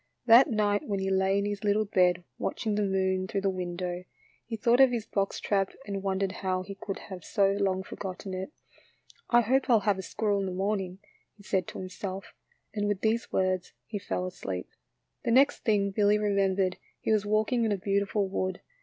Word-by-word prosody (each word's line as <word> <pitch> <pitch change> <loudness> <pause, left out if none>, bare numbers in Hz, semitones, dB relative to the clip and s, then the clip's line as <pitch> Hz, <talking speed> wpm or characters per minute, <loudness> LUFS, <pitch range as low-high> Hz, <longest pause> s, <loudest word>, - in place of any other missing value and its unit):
That 245 +5 +8
night 210 -3 +1
when 200 -2 -1
he 190 0 -1
lay 190 +1 +2
in 200 - 0
his 205 0 -3
little 210 +1 +2
bed 180 -3 +2 0.2
watching 220 -3 -2
the 210 - +1
moon 190 -1 +1
through 195 +1 -2
the 195 0 +1
window, 180 -1 -4 0.4
he 225 -1 -4
thought 235 +3 +3
of 265 -1 +8
his 235 -3 -2
box 195 -3 -1
trap 195 -2 0
and 200 -1 -3
wondered 195 0 0
how 185 -1 -2
he 200 +2 -7
could 195 0 -5
have 185 -3 -7
so 195 -1 +2
long 190 -1 +1
forgotten 190 0 -6
it. 185 +7 -4 0.4
" - - -39 0.3
I 240 0 +6
hope 260 +4 +1
I - - +6
'11 215 -4 +3
have 200 -2 +2
a - - -2
squirrel 205 +2 -1
in 195 - -1
the - - -3
morning," 190 -1 -1 0.4
he 200 - -18
said 190 -3 0
to - - -7
him 185 - -5
self, 190 +1 -6 0.4
and 205 -1 -1
with 205 -2 -1
these 225 +1 0
words 185 -1 0
he 210 - -4
fell 185 -2 -3
asleep. 100 - -5 0.5
The - - -1
next 265 +4 +5
thing 205 -3 +1
Billy 205 +1 +3
remembered 195 -2 +1 0.2
he - - -1
was 215 -2 +3
walking 215 +3 +2
in 220 - +1
a 200 - +1
beautiful 200 +1 0
wood. 185 -1 -2
195 Hz, 210 wpm, -29 LUFS, 190-210 Hz, 0.5 s, That